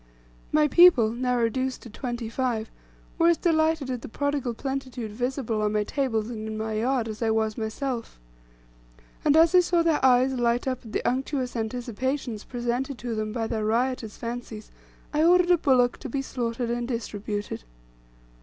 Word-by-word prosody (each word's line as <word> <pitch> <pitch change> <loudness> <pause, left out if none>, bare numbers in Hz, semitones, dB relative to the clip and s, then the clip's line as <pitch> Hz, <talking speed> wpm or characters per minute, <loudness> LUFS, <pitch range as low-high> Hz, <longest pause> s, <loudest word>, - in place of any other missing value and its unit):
My 300 0 +4
people, 300 -10 +6
now 250 +1 0
reduced 255 +3 -1
to 235 - -10
twenty 240 -1 -4
five, 230 -2 -2 0.5
were 335 - +5
as 340 -1 +4
delighted 315 -5 +1
at 250 -2 -3
the - - -7
prodigal 285 -2 -1
plenitude 255 -3 -4
visible 245 -1 -2
on 210 0 0
my 210 0 +2
tables 225 -3 -1
and 220 -2 -5
in 215 0 -4
my 220 0 -3
yard, 235 +2 0
as 215 0 -7
I 225 - +1
was 220 -1 +1
myself. 230 - -4 1.0
And 300 0 +4
as 330 +1 +6
I 365 - +8
saw 345 -1 +2
their 325 -4 +1
eyes 260 0 +5
light 240 0 +1
up 255 -1 -2
at 225 - -11
the - - -2
unctuous 260 0 -1
anticipations 240 +1 -3
presented 245 +2 -2
to 240 -1 -4
them 215 -1 -2
by 230 0 -2
their 225 -1 -2
riotous 230 0 -1
fancies, 230 -2 -6 0.4
I 300 +1 +2
ordered 355 +1 +5
a 355 - +6
bullock 250 -5 +3
to 275 - -7
be 270 +2 -2
slaughtered 235 -2 -3
and 240 0 -2
distributed. 210 - -4
245 Hz, 175 wpm, -26 LUFS, 225-270 Hz, 1.0 s, I